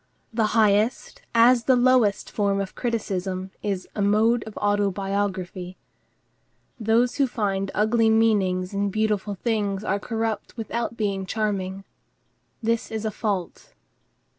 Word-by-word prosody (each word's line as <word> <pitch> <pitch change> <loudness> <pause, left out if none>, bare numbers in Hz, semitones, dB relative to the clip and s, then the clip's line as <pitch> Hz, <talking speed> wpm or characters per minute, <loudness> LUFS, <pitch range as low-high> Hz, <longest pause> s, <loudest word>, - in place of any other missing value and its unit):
The 220 -1 +2
highest 215 - +2
as 235 +1 +5
the 260 - +5
lowest 245 -5 +3
form 200 -1 0
of 195 -1 -4
criticism 190 -5 -3
is 195 -3 -3
a 210 - -3
mode 220 +4 +3
of 220 - -9
autobiography. 195 -2 -1 1.0
Those 230 +3 +2
who 275 -2 +3
find 195 -5 -1
ugly 220 +2 +3
meanings 205 -5 +2
in 200 0 0
beautiful 210 -1 -1
things 205 -2 -1
are 200 -1 0
corrupt 225 +2 -3
without 230 +1 -3
being 195 -3 -2
charming. 195 -2 -2 0.8
This 230 0 0
is 220 0 -4
a 215 - 0
fault. 200 -4 -4
210 Hz, 125 wpm, -24 LUFS, 195-225 Hz, 1.0 s, as